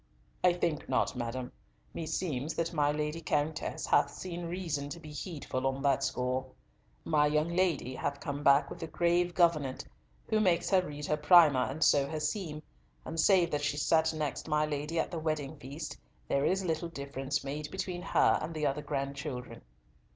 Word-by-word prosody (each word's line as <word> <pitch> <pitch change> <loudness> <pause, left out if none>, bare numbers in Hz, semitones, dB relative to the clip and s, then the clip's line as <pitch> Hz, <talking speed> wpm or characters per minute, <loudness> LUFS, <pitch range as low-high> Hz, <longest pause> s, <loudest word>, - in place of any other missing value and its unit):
"I 180 -1 +6
think 170 -4 -2
not, 130 +1 +1
madam. 125 +1 -4 0.4
Meseems 160 -3 -2
that 165 +1 -1
my 145 -2 +2
Lady 150 +2 -2
Countess 155 0 -1
hath 145 -1 +4
seen 175 +2 -6
reason 165 -5 -3
to 170 - -7
be 155 -2 -10
heedful 145 -4 -3
on 135 +1 -2
that 140 -2 +2
score. 125 +1 -1 0.6
My 150 -2 +3
young 150 +2 +1
lady 170 -8 +1
hath 140 +2 -3
come 145 0 -4
back 140 0 +4
with - - -8
a 165 - -3
grave 175 +2 +1
gouvernante, 155 - +2 0.4
who 215 - +2
makes 180 -4 +2
her 190 -1 +5
read 150 -4 -6
her 150 - 0
primer 150 -5 +6
and 155 +4 -2
sew 140 -1 +4
her 155 - -3
seam, 155 -1 -3 0.4
and 165 - -4
save 175 0 +4
that 150 - 0
she 145 0 -1
sat 160 +2 +3
next 155 -1 -3
my 150 -1 +2
Lady 150 +2 -2
at - - -1
the 170 - -3
wedding 155 -2 -2
feast 145 +3 -6 0.3
there 140 0 +1
is 190 +1 +1
little 165 0 -1
difference 140 -2 -3
made 150 +2 -4
between 180 -2 -4
her - - +3
and 160 +2 -5
the 155 -1 -1
other 140 +1 0
grandchildren." 140 -2 -4
150 Hz, 180 wpm, -31 LUFS, 140-170 Hz, 0.6 s, I